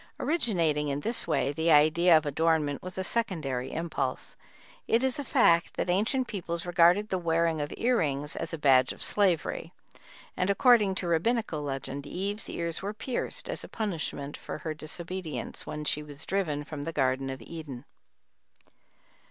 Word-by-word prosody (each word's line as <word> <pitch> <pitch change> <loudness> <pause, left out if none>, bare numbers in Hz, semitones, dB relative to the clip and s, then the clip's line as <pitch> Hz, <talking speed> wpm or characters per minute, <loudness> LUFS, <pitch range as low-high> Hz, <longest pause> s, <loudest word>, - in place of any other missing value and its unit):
Originating 170 - +1
in 140 0 -2
this 230 +4 0
way 140 -3 +1
the 160 +3 +1
idea 160 +3 +6
of 155 - -1
adornment 150 -1 +1
was 185 0 -8
a 190 - -1
secondary 155 - -1
impulse. 165 +1 -3 0.5
It 230 +3 +3
is 265 +1 +1
a - - -2
fact 170 -9 +3
that 175 - 0
ancient 235 +7 +1
peoples 170 -4 -4
regarded 175 +4 +4
the 185 - 0
wearing 165 -2 +1
of 145 - -4
ear 245 +1 +2
rings 145 -2 0
as 165 - -4
a 165 - -3
badge 130 -3 +4
of - - -3
slavery, 190 -6 +1 0.6
and, 180 - 0
according 210 -2 +5
to 190 - -3
a - - -2
Rabbinical 170 -1 +1
legend, 140 0 -4
Eve's 200 +6 -3
ears 170 -1 -3
were 205 +2 -4
pierced 260 - -4
as - - -4
a - - -8
punishment 160 -9 -4
for - - -6
her 155 +1 -4
disobedience, 165 +2 -5
when 150 0 -5
she 150 - 0
was 145 0 -6
driven 160 -7 -1
from 150 -1 -7
the 165 - -3
Garden 135 -2 +1
of 130 0 -5
Eden. 140 -1 -8
165 Hz, 170 wpm, -28 LUFS, 150-195 Hz, 0.6 s, idea